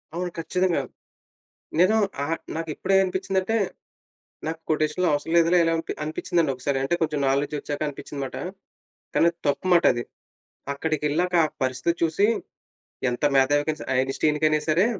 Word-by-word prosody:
అవును 180 0 -2
కచ్చితంగా. 180 -1 +1 1.0
నేను 185 +5 +5 0.3
ఆహ్, 165 +3 -1 0.2
నాకు 165 0 -4
ఇప్పుడే 195 +1 +1
అనిపించిందంటే 190 +2 -1 0.9
నాకు 160 0 -3
కొటేషన్‌లు 155 +3 +1
అవసరం 145 +3 -1
లేదులే! 170 +1 +5
ఇలాంపి 165 0 -1
అనిపించిందండి 165 0 0
ఒకసారి. 135 +2 -1
అంటే 135 +6 +1
కొంచెం 155 -2 0
నాలెడ్జ్ 140 +2 +1
వచ్చాక 145 +1 -5
అనిపించింది 145 0 -6
మాట. 130 - -7 0.8
కానీ 170 - +4
అది 170 - -36
తప్పు 145 - 0
మాట 170 0 +5
అది. 120 - -3 0.7
అక్కడికి 155 +2 -2
ఎళ్ళాక 180 +5 0
ఆ - - 0 0.2
పరిస్థితి 130 +6 0
చూసి, 165 +5 +3 0.8
ఎంత 120 +3 -4
మేధావికయినా 145 +3 +2
సరే! - - -5
ఐన్ 135 +1 0
స్టీన్ 150 -1 +2
కైనా 155 0 +4
సరే! 170 +6 +4
160 Hz, 150 wpm, -25 LUFS, 145-175 Hz, 1.0 s, నేను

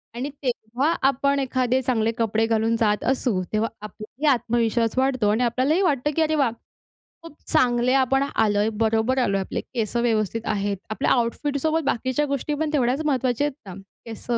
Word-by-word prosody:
आणि 265 +4 -3
तेव्हा 250 +5 -1 0.2
आपण 280 +1 0
एखादे 255 -1 0
चांगले 230 -3 0
कपडे 225 0 +1
घालून 225 0 +1
जात 210 -2 +1
असू, 245 -7 0
तेव्हा 220 +2 +1
आपला 215 0 -10
ही - - 0
आत्मविश्वास 230 -1 0
वाढतो 260 -5 +2
आणि 225 +4 +1
आपल्यालाही 260 +9 +1
वाटतं, 295 -4 +1
की 325 - +1
अरे 315 0 +2
वाह! 270 -6 +2 0.7
खूप 330 -3 -12
चांगले 245 0 +2
आपण 270 +1 +2
आलोय, 210 0 +2
बरोबर 225 +3 +1
आलोय, 195 -6 +1
आपले 190 - -4
केसं 235 -1 -3
व्यवस्थित 225 -1 0
आहेत. 200 -1 -2
आपल्या 215 +6 -1
आउटफिटसोबत 285 +6 0
बाकीच्या 260 +4 0
गोष्टी 280 +2 -2
पण 305 +1 -1
तेवढ्याच 260 +1 +1
महत्त्वाच्या 260 -1 +1
आहेत 295 - -5
ना. 185 - -7 0.3
केसं 230 +1 -3
245 Hz, 165 wpm, -23 LUFS, 225-275 Hz, 0.7 s, वाढतो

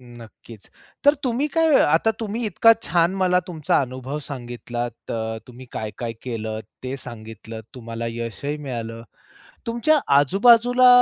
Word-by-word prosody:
नक्कीच, 115 -3 -14 0.4
तर 285 +1 +7
तुम्ही 255 +4 +1
काय 325 0 +4
अ, - - +5
आता 165 +9 +3
तुम्ही 225 +2 -3
इतका 220 +3 +6
छान 170 +1 +2
मला 180 -1 +3
तुमचा 160 -5 +1
अनुभव 130 +2 -4
सांगितलात. 120 -2 -5 0.2
अ, 110 0 -2
तुम्ही 125 0 -12
काय-काय 115 +2 -4
केलंत, 110 -3 -4 0.2
ते 130 +1 -3
सांगितलंत. 110 -2 -9
तुम्हाला 115 -1 -5
यशही 115 +5 -4
मिळालं, 115 -5 -5 0.7
तुमच्या 285 +7 +3 0.2
आजूबाजूला 235 - +5
130 Hz, 130 wpm, -23 LUFS, 115-195 Hz, 0.7 s, तर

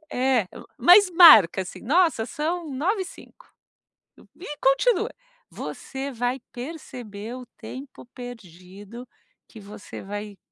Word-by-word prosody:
É, 250 -6 +1 0.3
mas 365 - +6
marca, 260 - +8
assim, 180 - -9
nossa, 320 -3 +2
são 335 +2 -3
21h05 380 - -4 0.9
e 315 -5 -8
continua. 275 - +2 0.4
Você 270 +1 -7
vai 245 +2 -2
perceber 245 -5 -8
o 250 - -10
tempo 265 -1 -10
perdido 205 -1 -11 0.4
que 220 - -14
você 205 +1 -10
vai 205 0 -7
255 Hz, 105 wpm, -24 LUFS, 210-320 Hz, 0.9 s, marca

